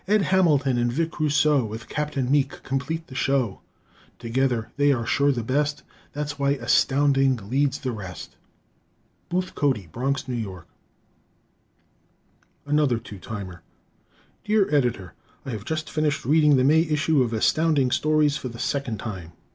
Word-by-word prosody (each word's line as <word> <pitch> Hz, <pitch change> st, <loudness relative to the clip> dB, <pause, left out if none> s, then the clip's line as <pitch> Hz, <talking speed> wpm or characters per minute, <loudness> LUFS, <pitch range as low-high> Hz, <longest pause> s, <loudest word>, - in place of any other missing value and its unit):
Ed 210 Hz, 0 st, +3 dB
Hamilton 145 Hz, -10 st, +2 dB
and 120 Hz, 0 st, +1 dB
Vic 165 Hz, +5 st, -2 dB
Rousseau 150 Hz, -2 st, +3 dB
With 110 Hz, +1 st, -7 dB
Captain 145 Hz, -3 st, -2 dB
Meek 145 Hz, -1 st, 0 dB
complete 140 Hz, +5 st, -3 dB
the 135 Hz, -, -13 dB
show. 130 Hz, -5 st, 0 dB, 0.6 s
Together 120 Hz, -1 st, -1 dB
they 145 Hz, 0 st, +3 dB
are 120 Hz, -4 st, 0 dB
sure 140 Hz, +3 st, +2 dB
the 120 Hz, -4 st, -2 dB
best; 145 Hz, +5 st, -1 dB, 0.3 s
That's 145 Hz, -1 st, -4 dB
why 140 Hz, 0 st, +2 dB
Astounding 135 Hz, -1 st, +2 dB, 0.2 s
leads 140 Hz, +1 st, +1 dB
the 130 Hz, -, -3 dB
rest! 95 Hz, -6 st, -8 dB, 0.9 s
Booth 180 Hz, +1 st, -2 dB
Cody, 130 Hz, -, 0 dB
Bronx, 135 Hz, +4 st, -2 dB
N. 120 Hz, -3 st, -2 dB
Y. 95 Hz, -4 st, -8 dB, 2.0 s
Another 145 Hz, -4 st, +2 dB
"Two 105 Hz, -3 st, -10 dB
Timer" 95 Hz, -4 st, -7 dB, 0.8 s
Dear 210 Hz, -6 st, +1 dB
Editor: 120 Hz, -, 0 dB, 0.3 s
I 135 Hz, -, -4 dB
have 105 Hz, -3 st, -6 dB
just 155 Hz, -1 st, -3 dB
finished 155 Hz, -4 st, -1 dB
reading 150 Hz, +1 st, +4 dB
the 130 Hz, -, +3 dB
May 155 Hz, +4 st, +5 dB
issue 155 Hz, -2 st, +1 dB
of 120 Hz, -2 st, 0 dB
Astounding 140 Hz, +3 st, +2 dB
Stories 155 Hz, 0 st, +2 dB
for 130 Hz, -, -6 dB
the 115 Hz, -, -10 dB
second 135 Hz, -3 st, -2 dB
time. 95 Hz, -6 st, -7 dB
140 Hz, 145 wpm, -24 LUFS, 120-150 Hz, 2.0 s, May